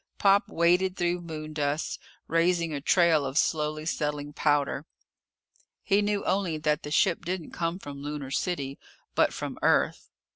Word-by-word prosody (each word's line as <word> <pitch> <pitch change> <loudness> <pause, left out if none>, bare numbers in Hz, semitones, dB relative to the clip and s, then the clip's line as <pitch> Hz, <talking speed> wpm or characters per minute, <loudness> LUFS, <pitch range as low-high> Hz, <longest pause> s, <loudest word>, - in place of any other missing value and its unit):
Pop 200 0 +4
waded 180 +3 +2
through 175 0 0
moondust, 155 -2 -3 0.3
raising 170 -1 +2
a 140 - -3
trail 165 -1 +4
of 135 +1 -3
slowly 155 -1 0
settling 150 -2 -2
powder. 145 0 +1 1.0
He 200 0 +3
knew 205 -1 -1
only 185 -5 0
that 150 0 0
the - - -7
ship 170 +3 +2
didn't 175 -1 -4
come 170 +1 -2
from 145 -6 -9
Lunar 145 -2 -5
City, 140 -4 -2 0.3
but - - +3
from - - -5
Earth. - - +2
160 Hz, 145 wpm, -28 LUFS, 150-175 Hz, 1.0 s, Pop